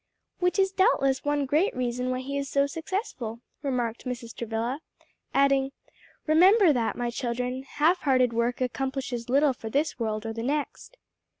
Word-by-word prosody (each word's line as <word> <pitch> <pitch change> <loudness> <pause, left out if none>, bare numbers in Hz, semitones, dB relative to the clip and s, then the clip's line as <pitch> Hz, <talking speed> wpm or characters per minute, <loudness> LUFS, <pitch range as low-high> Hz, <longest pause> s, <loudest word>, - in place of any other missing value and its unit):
"Which 360 +2 +1
is 385 -1 +3
doubtless 275 -8 +2
one 290 -1 +1
great 305 +9 +1
reason 250 0 -1
why 255 0 -1
he 275 +2 -5
is 280 -1 -2
so 280 0 +3
successful," 280 - -4 0.2
remarked 245 -5 -2
Mrs. 245 -2 -5
Travilla, 235 +4 -2 0.5
adding, 275 -1 +3 0.5
"Remember 360 +3 +6
that, 235 -3 0
my 240 -1 -1
children; 250 +1 -2
half 305 +6 +1
hearted 255 -5 +2
work 235 +2 0
accomplishes 255 -1 -3
little 280 +2 +4
for 225 -2 -7
this 290 +6 0
world 215 -1 -2
or 225 - -3
the 225 - -5
next." 295 - -3
265 Hz, 160 wpm, -27 LUFS, 240-290 Hz, 0.5 s, Remember